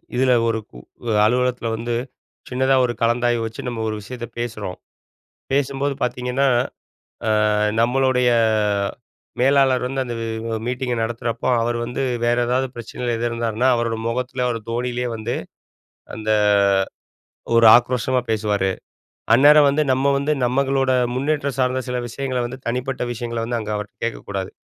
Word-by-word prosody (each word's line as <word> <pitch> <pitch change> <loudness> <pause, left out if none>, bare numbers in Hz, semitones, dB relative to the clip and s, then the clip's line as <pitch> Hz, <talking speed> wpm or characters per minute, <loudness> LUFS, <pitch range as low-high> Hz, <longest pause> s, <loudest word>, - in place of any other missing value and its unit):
இதில 130 0 +3
ஒரு 115 -1 0 0.5
உ - - 0 0.2
அலுவலகத்தில 125 0 +1
வந்து, 120 +1 -2 0.5
சின்னதா 130 +1 +2
ஒரு 120 - -2
கலந்தாய்வு 120 0 +2
வச்சு 115 0 -6
நம்ம 115 -2 -4
ஒரு 110 - -3
விஷயத்த 120 +3 -7
பேசுறோம். 110 -6 -4 0.8
பேசும்போது 140 0 0
பார்த்தீங்கன்னா, 125 +2 0 0.8
ஆ - - +2 0.5
நம்மளுடைய 125 +1 +2 1.1
மேலாளர் 135 -1 +3
வந்து 135 +1 -2
அந்த 120 -1 -4 0.5
மீட்டிங்கை 125 0 -2
நடத்துறப்போ 115 +1 -3
அவர் 120 +1 0
வந்து 125 +3 -4 0.2
வேறு 120 +1 +2
ஏதாவது 130 +2 +1
பிரச்சனையில 120 0 -4
எதிர் 120 +1 -1
இருந்தாருன்னா, 115 +2 0
அவரோட 115 -1 -1
முகத்தில் 125 +1 -2
அவர் 115 -2 -2
தோணியிலேயே 125 +1 -2
வந்து, 110 +2 -3 0.8
அந்த 110 0 -3 1.3
ஒரு 115 0 +6
ஆக்ரோஷமா 125 +1 -1
பேசுவாரு. 105 -3 0 0.6
அந்நேரம் 145 +3 +7
வந்து 150 +2 +1
நம்ம 135 +2 +2
வந்து 140 +2 0
நமக்களோட 135 +1 +1 0.2
முன்னேற்றம் 140 +1 -1
சார்ந்த 130 0 +1
சில 125 0 -1
விஷயங்கள 130 +1 -3
வந்து 130 +2 -8
தனிப்பட்ட 125 +2 -2
விஷயங்கள 120 -1 -4
வந்து, 120 0 -1
அங்கே 105 -1 -3
அவர்கிட்ட 105 0 -7
கேட்க 115 - -4
கூடாது, 95 -2 -3
125 Hz, 135 wpm, -21 LUFS, 115-130 Hz, 1.3 s, அந்நேரம்